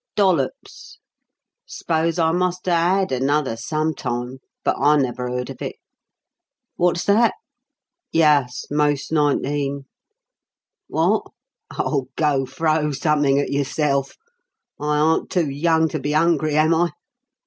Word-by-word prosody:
"Dollops. 185 -10 -1 0.7
S'pose 165 +1 -1
I 160 -1 +2
must 180 +1 -1
a - - +2
had 180 +2 +2
another 135 0 0
sometime, 130 -2 -3 0.2
but - - +1
I 150 +1 +4
never 125 -2 -1
heard 125 0 -3
of - - -12
it. - - -4 1.0
Wot's 175 0 +1
that? 220 +3 +3 0.8
Yuss 145 -6 +2
most 145 -1 0
nineteen. 145 -2 0 1.1
Wot? - - 0 0.5
Oh, 135 -4 -1
go 140 -4 +1
throw 155 +2 0
summink 145 -1 +2
at - - -5
yourself! 140 0 -1 0.6
I 150 0 0
aren't 155 +2 +2
too 165 -6 0
young 160 +3 +2
to 155 - -3
be 145 +2 -2
'ungry, 155 -2 +2
am 155 +2 +4
I? 170 +1 +1
150 Hz, 120 wpm, -21 LUFS, 140-165 Hz, 1.1 s, I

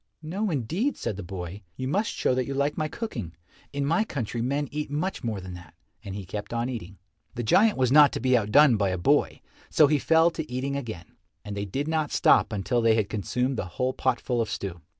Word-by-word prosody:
"No, 195 +7 -2
indeed," 170 - -1
said 105 - -3
the 100 - -6
boy, 90 +1 -7
"you 130 - -4
must 205 +10 0
show - - 0
that 125 -1 -1
you 140 - -3
like 140 +2 0
my 155 - -1
cooking. 120 - -6 0.4
In 140 0 -2
my 165 +8 +2
country 120 - -4
men 140 +4 -1
eat 150 0 -3
much 155 +3 -3
more 110 -4 -2
than 90 -1 -8
that," 90 -4 -12 0.3
and 95 - -6
he 100 -2 -6
kept 105 +5 -6
on 120 +1 -1
eating. 100 -6 -7 0.4
The 120 - -3
giant 210 - +4
was 130 -2 +2
not 145 -1 +7
to - - -2
be 130 -1 +3
outdone 120 +3 +5
by 100 -2 +1
a 95 - -1
boy, 85 - +1 0.3
so 155 - +5
he 145 0 +2
fell 165 +4 +4
to 160 -5 -6
eating 135 +2 -2
again, 110 -11 -7 0.3
and 105 -1 -5
they 100 0 -3
did 135 +10 -3
not 155 -2 0
stop - - +4
until 110 +4 0
they 115 -1 +4
had 105 -3 0
consumed 125 +5 -1
the - - -2
whole 130 0 0
potful 125 -2 0
of 115 - -2
stew. 90 -4 -5
125 Hz, 230 wpm, -26 LUFS, 105-150 Hz, 0.4 s, not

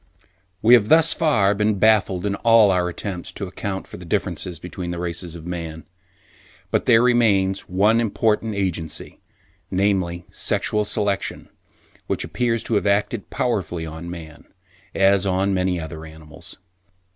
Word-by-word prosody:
We 115 +3 +6
have 110 -4 +5
thus 165 0 +6
far 110 - +2
been 105 0 0
baffled 100 -3 +2
in 100 - 0
all 115 -3 +5
our 90 -1 +1
attempts 90 0 -6
to 100 - -5
account 95 +1 -5
for - - -11
the - - -11
differences 90 -2 -2
between 90 +1 -7
the 85 - -4
races 85 0 -4
of 80 -1 -10
man; 85 -2 -6 0.9
but - - 0
there 115 +1 +6
remains 100 -6 +2
one 105 +5 +3
important 110 -1 0
agency, 90 -5 -3 0.5
namely 95 -3 0
Sexual 105 0 -1
Selection, 100 -2 -2 0.6
which - - -1
appears 115 +7 -1
to - - -3
have 105 -1 +1
acted 100 +1 0
powerfully 90 -8 -2
on 80 +2 -8
man, 80 -3 -10 0.5
as 100 0 +3
on 95 +1 +1
many 90 -1 0
other 80 0 -7
animals. 80 +2 -12
95 Hz, 145 wpm, -22 LUFS, 85-105 Hz, 0.9 s, We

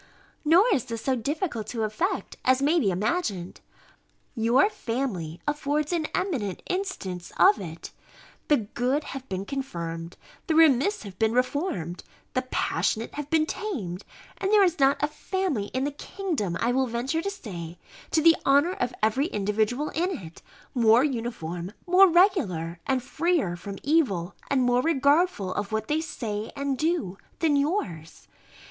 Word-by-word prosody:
Nor 335 +7 +6
is 260 - 0
this 230 -3 -5
so 265 - +1
difficult 255 - -2
to 225 -1 -2
effect, 220 - -2
as 260 0 +4
may 300 +5 +3
be 205 - +2
imagined. 195 - -2 0.7
Your 235 - +4
family 225 - -3
affords 295 +2 0
an 320 -3 0
eminent 250 - -2
instance 200 - -4
of 210 - +6
it: 165 -3 -8 0.6
the 295 - +5
good 245 +7 -1
have 270 -2 -8
been 190 +1 -3
confirmed, 170 -11 -5 0.3
the 320 - +1
remiss 320 - +4
have 195 -3 -10
been 220 0 +2
reformed, 250 - -1 0.3
the 255 - +1
passionate 230 -2 -1
have 295 0 -5
been 315 -1 +3
tamed; 225 - -4 0.4
and 385 - -1
there 420 -1 +6
is 350 -3 +1
not 275 0 +4
a - - +4
family 305 - -2
in 260 +4 -2
the 290 - -1
kingdom, 285 - -3
I 235 - +1
will 260 +1 +1
venture 245 +7 -1
to 395 - -2
say, 180 - -7 0.3
to 315 - +2
the 330 0 +7
honour 285 +6 +4
of 250 -9 -2
every 255 +8 +2
individual 215 - 0
in 350 +3 0
it, 165 -5 -11 0.3
more 235 0 +5
uniform, 215 - -3
more 370 +2 +7
regular, 200 - +2
and 260 -2 +1
freer 330 - 0
from 195 +3 -7
evil, 240 - +1 0.2
and 270 -2 +2
more 245 0 +3
regardful 285 - +2
of 205 +1 -3
what 220 0 -2
they 305 +1 +1
say 220 -9 -4
and 280 -1 -1
do, 305 - -1 0.2
than 315 -3 +2
yours. 280 - -2
260 Hz, 155 wpm, -26 LUFS, 205-315 Hz, 0.7 s, the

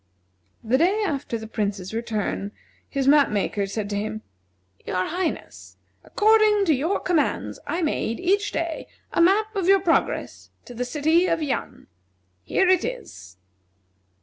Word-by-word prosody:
The 240 +4 +2
day 390 +6 +2
after 280 -8 -2
the 220 - -8
Prince's 205 -3 -3
return 215 -3 -3 0.4
his 275 -2 -1
map 290 0 +6
maker 205 -1 -1
said 205 +1 -3
to - - -1
him: 215 +1 -4 0.6
"Your 185 0 -1
Highness, 350 +1 -4 0.3
according 430 -1 +4
to 320 - +4
your 310 +8 0
commands 340 -4 -1
I 345 +1 -1
made, 230 -6 -1
each 400 +3 +1
day, 330 -1 -3 0.3
a - - +2
map 425 +5 +3
of 380 -3 -1
your 390 0 +6
progress 350 -3 -1 0.2
to 245 - -10
the 245 +1 -3
city 315 +7 +2
of 330 -3 0
Yan. 280 - -4 0.6
Here 380 - +1
it 370 -1 +4
is." 455 - -7
305 Hz, 150 wpm, -24 LUFS, -, 0.6 s, map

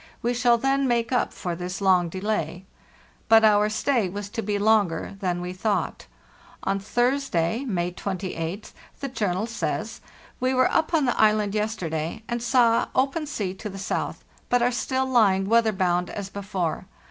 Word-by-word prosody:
We 240 +1 +1
shall 240 -1 +3
then 270 +2 +1
make 235 -1 0
up 250 - +1
for 175 -2 -4
this 180 +2 -5
long 185 -3 +3
delay." 185 -2 -3 0.6
But 225 0 +7
our 210 0 +4
stay 220 -2 +1
was 200 +2 -6
to 225 +2 -3
be 205 -1 -1
longer 205 -5 +1
than 180 -3 -1
we 180 0 -4
thought. 205 +3 -2 0.6
On 195 0 0
Thursday, 240 -2 0
May 180 -7 -1
28th, 185 0 -4 0.3
the 275 - -3
journal 205 -5 -1
says: 230 0 -3 0.4
"We 255 +1 +1
were 255 - +3
up 320 +1 +1
on 300 -4 +3
the 245 - +1
island 210 -2 +3
yesterday, 185 -5 -2
and 235 0 -2
saw 235 -1 +3
open 275 +4 +1
sea 205 -10 -3
to 200 +2 -7
the 195 - -8
south, 195 +2 -3 0.3
but 245 -1 +3
are 245 - +3
still 260 +2 -1
lying 205 -7 +3
weather 230 0 +4
bound 180 -2 0
as 200 -2 -6
before. 190 -3 -3
210 Hz, 170 wpm, -25 LUFS, 185-240 Hz, 0.6 s, But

